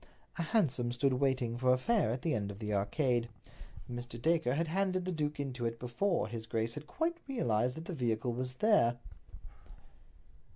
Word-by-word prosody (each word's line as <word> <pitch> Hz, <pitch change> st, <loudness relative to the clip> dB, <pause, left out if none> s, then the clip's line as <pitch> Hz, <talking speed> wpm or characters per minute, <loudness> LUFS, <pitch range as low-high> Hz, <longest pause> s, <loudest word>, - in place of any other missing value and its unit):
A -, -, +2 dB
hansom 150 Hz, -, +1 dB
stood 130 Hz, +2 st, +2 dB
waiting 125 Hz, -3 st, +1 dB
for 130 Hz, 0 st, +4 dB
a 130 Hz, -, +5 dB
fare 215 Hz, -, +2 dB
at 125 Hz, +3 st, -2 dB
the 165 Hz, -, +1 dB
end 100 Hz, -4 st, -1 dB
of 100 Hz, -, -7 dB
the 105 Hz, 0 st, -3 dB
Arcade. 120 Hz, +4 st, +1 dB, 0.6 s
Mr. 120 Hz, -1 st, -6 dB
Dacre 160 Hz, -2 st, +2 dB
had 165 Hz, +2 st, 0 dB
handed 185 Hz, +1 st, 0 dB
the 185 Hz, -, -1 dB
duke 150 Hz, -3 st, -2 dB
into 130 Hz, -3 st, -3 dB
it 115 Hz, 0 st, -1 dB
before 125 Hz, -, 0 dB
his 115 Hz, 0 st, -6 dB
grace 115 Hz, 0 st, -1 dB
had 150 Hz, +3 st, -7 dB
quite 335 Hz, -, -1 dB
realized 125 Hz, -, +1 dB
that 160 Hz, -, -6 dB
the 180 Hz, -, -5 dB
vehicle 120 Hz, -4 st, 0 dB
was 125 Hz, +1 st, -3 dB
there. 130 Hz, -, +4 dB
125 Hz, 180 wpm, -33 LUFS, 120-160 Hz, 0.6 s, a